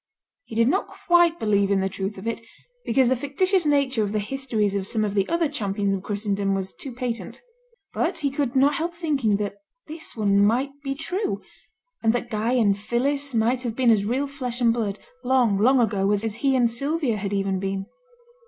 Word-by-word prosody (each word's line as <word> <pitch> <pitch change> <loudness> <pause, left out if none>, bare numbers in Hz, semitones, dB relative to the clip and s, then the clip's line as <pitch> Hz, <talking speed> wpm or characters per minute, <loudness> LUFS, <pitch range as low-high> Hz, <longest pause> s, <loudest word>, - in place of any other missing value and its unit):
He - - -9
did 230 +1 +4
not 370 +9 +1 0.2
quite 345 -1 +5
believe 200 -2 +2
in 200 -1 +2
the 190 - +1
truth 195 +1 -4
of 190 - -9
it, 230 0 -2 0.4
because 255 +2 +3
the 260 - +3
fictitious 330 +7 +1
nature 280 -5 +2
of 205 0 -3
the - - +1
histories 215 -2 -1
of 195 -1 -1
some 215 -1 +1
of 205 - -2
the 195 -2 +1
other 335 -1 +2
Champions 200 -7 -1
of 195 - -2
Christendom 200 -1 -1
was 190 0 -3
too 270 - -7
patent. 240 -1 -4 0.5
But - - 0
he 290 -4 -1
could 275 -2 -2
not 275 +2 +4
help 340 +1 -2
thinking 285 -11 +1
that 205 0 -3 0.3
this 315 +1 -7
one 200 -2 +3
might 245 +7 +2
be 275 -1 -2
true; 365 +8 -3 0.6
and 225 0 +3
that 240 0 -3
Guy 220 +3 0
and 215 -6 +3
Phillis 270 +6 -1
might 235 +3 +2
have 235 -3 -3
been 250 -2 +4
as 210 -3 +3
real 250 +7 0
flesh 260 -4 -4
and 235 -2 +4
blood, 210 -4 -2 0.3
long, 245 -6 +3
long 255 +5 +4
ago, 200 -4 +1
as 205 0 0
he 270 +4 +1
and 245 -2 +4
Sylvia 275 0 -1
had 200 -1 -3
even 195 -1 0
been. 195 0 -3
235 Hz, 205 wpm, -24 LUFS, 205-275 Hz, 0.6 s, quite